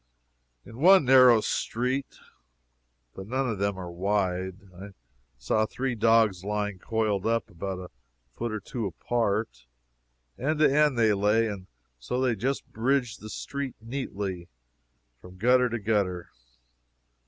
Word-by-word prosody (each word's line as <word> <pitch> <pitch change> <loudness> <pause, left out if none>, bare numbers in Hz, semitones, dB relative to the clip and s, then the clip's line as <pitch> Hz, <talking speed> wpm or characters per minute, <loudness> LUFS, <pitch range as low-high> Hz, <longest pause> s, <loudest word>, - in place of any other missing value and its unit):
In 115 - -12
one 185 0 +6
narrow 125 -3 +7
street 125 +6 -2 1.0
(but 95 - -9
none 130 +3 -1
of 110 -5 -3
them 100 -1 -1
are 90 -2 -6
wide) 95 0 -1 0.2
I 100 +2 -10 0.4
saw 110 - 0
three 130 +2 -3
dogs 110 -4 +3
lying 105 -1 -2
coiled 110 -1 -1
up, 115 0 -1
about 95 +2 -5
a 90 -1 -9 0.4
foot 120 -1 -3
or 110 - -3
two 110 +2 -4
apart. 105 - -2 0.7
End 150 +5 0
to 150 -2 +4
end 150 -4 +3
they 110 -2 +4
lay, 105 +3 +2
and 100 -3 -6 0.3
so 125 - -3
they 130 -3 +1
just 135 +5 -2
bridged 120 0 0
the 110 - -8
street 140 +3 -5
neatly, 100 -7 -5 0.7
from 90 0 -13
gutter 125 +4 +3
to 120 - -2
gutter. 100 -5 -1
110 Hz, 140 wpm, -27 LUFS, 100-125 Hz, 1.0 s, narrow